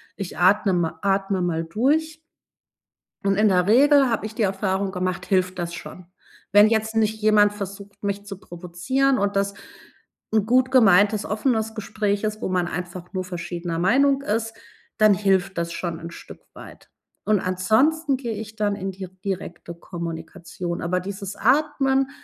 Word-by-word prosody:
ich 195 -3 -6
atne 195 +2 +4
mal 165 -2 -1
atme 195 -1 +1
mal 165 -2 -1
durch. 300 - 0 1.0
Und 195 0 +2
in 215 +1 +4
der 180 -2 +2
Regel 275 +4 +5
habe 225 -2 -1
ich 215 0 -7
die - - -3
Erfahrung 195 0 -1
gemacht, 185 -1 -3
hilft 185 -1 0
das 170 -1 -4
schon. 180 +1 -9 0.5
Wenn 205 +1 +7
jetzt 220 0 0
nicht 220 0 +1
jemand 210 -1 +4
versucht, 200 0 -8
mich 200 0 -3
zu 200 -2 -7
provozieren 185 +11 -1
und 200 0 -1
das 200 0 0 0.8
'n 215 -2 +3
gut 255 +3 +3
gemeintes, 210 -3 +5
offenes 220 0 -1
Gespräch 205 -1 -2
ist, 215 0 -2
wo - - -2
man 180 -1 0
einfach 180 +1 -6
nur 185 -1 -2
verschiedener 175 -1 -5
Meinung 275 +9 +3
ist, 225 -2 -2 0.4
dann 215 -1 +6
hilft 190 -1 +1
das 170 0 -2
schon 170 -2 -4
'n 170 0 -8
Stück - - -12
weit. - - -13 0.4
Und 210 -1 +3
ansonsten 260 - +1
gehe 240 -3 -4
ich 215 +1 -7
dann 205 -1 0
in 195 -1 -4
die 190 0 -8 0.2
direkte 180 -3 -5
Kommunikation. 170 +1 -6
Aber 180 +2 0
dieses 195 +1 -6
Atmen 270 +2 +2
200 Hz, 160 wpm, -23 LUFS, 180-220 Hz, 1.0 s, Wenn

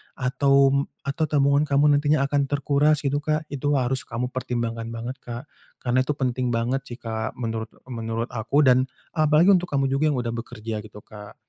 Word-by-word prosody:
atau 135 +1 +3
m 140 - +2 0.3
atau 140 +3 -1
tabungan 140 0 +3
kamu 145 +1 +4
nantinya 145 -1 +2
akan 140 -1 +1
terkuras 145 +1 +2
gitu 145 +1 +1
Kak, 155 +1 -2
itu 145 +1 0
harus 130 0 0
kamu 125 +2 -3
pertimbangkan 115 -2 -3
banget 120 +3 -5
Kak, 120 +1 -6 0.4
karna 125 +1 +2
itu 150 - 0
penting 130 -2 -1
banget 125 +4 0
sih 120 - -7
Kak 110 -1 -4
menurut 115 -1 -3 0.2
menurut 115 0 -3
aku 125 +6 +1
dan 130 +1 +4 0.3
apalagi 155 +4 +5
untuk 180 -2 +3
kamu 135 -1 +1
juga 135 +2 +1
yang - - -1
udah 115 - -2
bekerja 115 -2 -5
gitu 105 -1 -12
Kak. 105 -1 -12
130 Hz, 185 wpm, -24 LUFS, 115-145 Hz, 0.4 s, apalagi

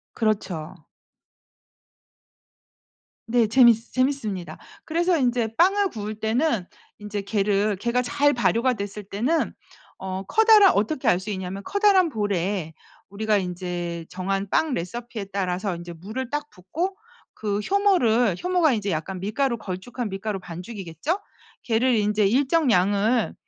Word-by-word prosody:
그렇죠. 190 -7 -2 2.5
네. 235 -1 +4
재밌 240 0 +7 0.2
재밌습니다. 255 -9 -1 0.3
그래서 340 +2 +1
인제 240 -4 0
빵을 390 +3 +4
구울 215 -1 -5
때는 220 - 0 0.3
인제 210 -1 -4
걔를 205 0 +1
걔가 240 +5 0
잘 290 +3 +2
발효가 245 +1 +2
됐을 205 -1 -6
때는 240 +12 -1 0.4
어 190 0 -5
커다라 435 - +6
어떻게 220 +8 0
알 180 - +3
수 200 +3 -7
있냐면 190 0 -5
커다란 400 -3 +4
볼에 195 - -2 0.4
우리가 210 +1 0
인제 175 -2 -4
정한 195 +2 -2
빵 310 -4 +1
레시피에 220 +4 -5
따라서 190 0 -1
인제 175 0 -8
물을 215 +9 -6
딱 295 0 -3
붓고 330 - -4 0.4
그 205 -1 -2
효모를 245 - +2
효모가 360 -4 +3
인제 205 -3 -1
약간 180 +4 -3
밀가루 235 +5 -1
걸쭉한 210 +5 -5
밀가루 195 +1 -4
반죽이겠죠? 185 - -5 0.4
걔를 240 +2 +2
인제 210 -1 +2
일정량을 230 - +2
215 Hz, 275 characters per minute, -24 LUFS, 195-260 Hz, 2.5 s, 재밌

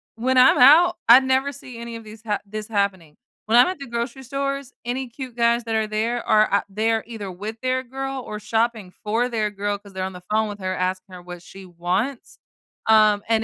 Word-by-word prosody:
when 255 +3 0
I'm 255 +4 +6
out, 320 +7 +7
I 235 +2 +10
never 265 +2 0
see 255 -4 -11
any 235 0 -7
of 230 - -9
these 215 0 -12
ha 210 -2 -1
this 210 +1 -7
happening. 195 -7 -2 0.3
When 225 +2 +4
I'm 245 - +7
at 370 0 -3
the 275 - -8
grocery 235 +2 -4
stores, 275 +1 -4
any 255 +2 -3
cute 250 0 -9
guys 235 0 +2
that 225 -1 -2
are 220 0 +1
there 225 +3 -2
are, 215 0 +5
are 200 - +1
ou 195 - -23
they're 225 +1 +1
either 220 -4 -7
with 210 +5 -7
their 255 0 0
girl 270 +1 -5
or 210 - -6
shopping 225 -2 -1
for 230 +4 0
their 215 -3 -1
girl 205 0 -2
'cause 200 -1 -17
they're 190 0 -4
on 190 0 -4
the 180 - -10
phone 215 0 +1
with 205 - -7
her 185 -1 -3
asking 185 +1 -3
her 180 - -9
what 175 0 -10
she 195 +2 -12
wants, 180 +9 -3 0.5
um, 215 -2 +5
and 225 -1 +2
225 Hz, 230 wpm, -22 LUFS, 205-250 Hz, 0.5 s, I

